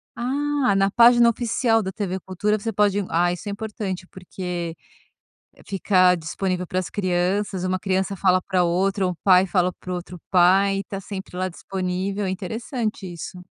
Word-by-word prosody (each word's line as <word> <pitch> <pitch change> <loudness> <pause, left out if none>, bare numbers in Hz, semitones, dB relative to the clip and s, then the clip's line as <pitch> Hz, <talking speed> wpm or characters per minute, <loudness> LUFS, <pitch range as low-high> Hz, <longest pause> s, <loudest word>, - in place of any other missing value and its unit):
Ah, 275 -1 0
na 195 0 +3
página 235 +2 +6
oficial 230 0 +1
da 190 - -3
TV 190 -2 -3
Cultura 200 +4 -1
você 225 +2 -3
pode, 205 -1 +2
ah, 175 +1 +2
isso 180 +4 -6
é - - -2
importante, 200 -3 -5
porque 180 -2 -6 0.9
ficar 185 -2 +3
disponível 180 +2 -3
para 185 - -1
as 185 - -4
crianças, 185 0 -1
uma 185 0 0
criança 190 0 -1
fala 185 -1 +3
pra 185 -2 +1
outra, 190 +3 +1
um 180 - -1
pai 185 -1 +6
fala 180 -1 +1
para 185 - -7
o - - -1
outro 180 0 -8
pai, 190 +2 +4
e - - -3
tá 195 +1 -6
sempre 195 -1 -8
lá 185 0 -1
disponível, 190 +2 -3
é - - -1
interessante 215 +1 -4
isso. 175 +1 -8
190 Hz, 175 wpm, -23 LUFS, 180-205 Hz, 0.9 s, página